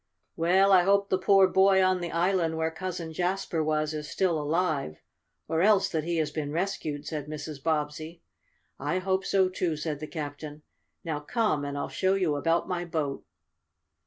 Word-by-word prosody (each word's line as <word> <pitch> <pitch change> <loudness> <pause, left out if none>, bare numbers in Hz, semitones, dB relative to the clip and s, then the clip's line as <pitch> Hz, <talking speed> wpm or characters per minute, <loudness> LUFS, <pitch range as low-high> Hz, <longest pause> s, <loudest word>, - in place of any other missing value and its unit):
"Well, 185 +4 +3
I 185 -2 +7
hope 200 +2 +2
the 185 - +2
poor 195 0 +5
boy 190 0 +4
on 185 -1 +2
the 175 - -3
island 170 -1 +1
where 160 0 0
Cousin 165 -1 -5
Jasper 180 -1 -1
was 155 0 0
is 150 -1 -5
still 170 -5 0
alive, 150 - -1 0.5
or 160 +1 0
else 205 +1 +4
that 160 -2 -2
he 170 0 -1
has 155 -2 0
been 145 -1 -4
rescued," 155 -4 -3
said 150 -3 -5
Mrs. 150 -1 -7
Bobbsey. 155 +2 -3 0.6
"I 180 - -1
hope 190 +1 0
so, 190 -1 +2
too," 180 -3 -2
said 150 -1 -3
the 155 - -6
captain. 150 -1 -7 0.4
"Now 160 -3 -3
come 180 -2 0
and 145 0 -4
I'll - - -2
show 190 0 +1
you 180 -6 +1
about 165 +4 +1
my 175 -1 -2
boat." 155 -5 -3
165 Hz, 180 wpm, -28 LUFS, 150-185 Hz, 0.6 s, I